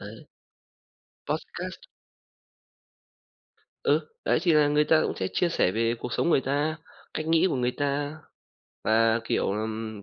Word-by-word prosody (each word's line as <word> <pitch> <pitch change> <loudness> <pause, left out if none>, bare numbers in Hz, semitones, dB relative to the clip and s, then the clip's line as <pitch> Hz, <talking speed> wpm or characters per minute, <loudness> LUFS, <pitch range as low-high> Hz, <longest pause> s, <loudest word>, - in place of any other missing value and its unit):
Đấy. - - -8 1.1
Podcast. - - -4 2.1
Ừ, - - +3 0.2
đấy - - +3
thì 175 -3 +3
là 150 -1 +5
người 150 +1 +3
ta 155 +1 +4
cũng - - -1
sẽ 95 - -1
chia 180 - +2
sẻ 165 - +2
về 115 +2 +1
cuộc 125 - -5
sống 170 - +1
người 140 - +4
ta, 145 +4 -1 0.4
cách 155 - -3
nghĩ 165 +2 +4
của 155 - -1
người 125 -1 +1
ta, 145 +1 -1 0.7
và, 115 +1 +3
kiểu, - - 0
ừm, 110 0 -4
140 Hz, 150 wpm, -27 LUFS, 115-155 Hz, 2.1 s, là